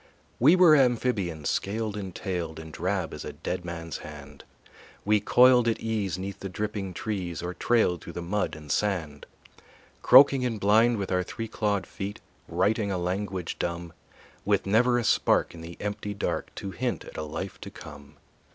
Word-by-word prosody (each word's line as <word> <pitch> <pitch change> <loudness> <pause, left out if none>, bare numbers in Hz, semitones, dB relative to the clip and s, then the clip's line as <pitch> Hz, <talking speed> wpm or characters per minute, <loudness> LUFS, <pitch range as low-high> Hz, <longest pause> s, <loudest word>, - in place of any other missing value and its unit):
We 150 +9 +6
were 180 -4 +7
amphibians, 115 - +1
scaled 105 +1 -2
and 95 -4 -6
tailed, 85 -5 -4
And 80 0 -9
drab 95 +4 -2
as - - -7
a - - -6
dead 90 0 -4
man's 85 -2 -6
hand; 75 -2 -11 0.6
We 105 +1 +4
coiled 125 +3 +5
at 115 - +1
ease 105 -6 -2
'neath 100 +1 -6
the 95 - -5
dripping 100 -1 -4
trees 90 -6 -4
Or 90 +1 -3
trailed 90 -3 +1
through 85 - -9
the 85 - -5
mud 100 +1 -1
and 75 -2 -8
sand. 80 -6 -1 0.7
Croaking 135 0 +7
and 115 -4 -1
blind, 110 +4 +4
with 100 -2 -3
our 90 0 +2
three 115 +5 -5
clawed 105 -2 -1
feet 100 +1 -6 0.3
Writing 100 +4 +1
a 95 - -1
language 90 0 -3
dumb, 85 -1 -3 0.5
With 100 -1 +1
never 120 +5 +3
a 120 - 0
spark - - +2
in 85 - -10
the 85 +1 -9
empty 105 0 -4
dark - - -2
To 100 - -5
hint 125 +4 -3
at - - -12
a - - -3
life 80 +5 -6
to - - -7
come. 70 -2 -12
100 Hz, 180 wpm, -27 LUFS, 85-110 Hz, 0.7 s, were